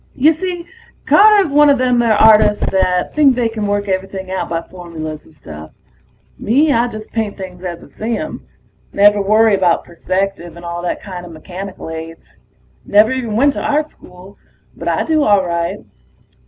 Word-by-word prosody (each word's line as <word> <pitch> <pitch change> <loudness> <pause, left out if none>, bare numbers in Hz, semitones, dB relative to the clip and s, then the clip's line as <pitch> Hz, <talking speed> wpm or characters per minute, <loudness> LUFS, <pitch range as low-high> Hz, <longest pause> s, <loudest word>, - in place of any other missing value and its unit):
Y'see, 335 +5 0 0.4
Carter 420 -1 +6
was 300 - -5
one 295 0 +6
a 285 - +5
them 250 -2 +1
artists 215 -2 +4
that 185 -1 0
think 285 -4 +4
they 240 -2 0
can 220 -2 -4
work 205 0 -1
everything 190 0 -4
out 190 - -3
by 165 0 -1
formulas 165 -3 -8
and 155 - -21
stuff. 75 0 -11 0.7
Me, 285 +7 +2
I 235 +1 +2
just 215 -2 -9
paint 220 -3 -3
things 185 -2 -9
as 175 -2 -6
I - - -14
see 225 +1 -4
'em. 310 0 -6 0.5
Never 205 0 +4
worry 215 +2 +3
about 185 -3 +2
perspective 185 0 -4
and 175 - -11
all 170 0 -5
that 175 - -4
kinda 180 -3 -8
mechanical 180 +2 -8
aids. 160 0 -9 0.5
Never 210 +3 +4
even 245 -5 -3
went 280 +5 +3
to - - -5
Art 300 +1 -1
School. 180 +2 -16 0.4
But - - -8
I - - 0
do 315 -1 +1
all 205 -7 +3
right. 170 -1 -3
205 Hz, 175 wpm, -16 LUFS, 180-245 Hz, 0.7 s, Carter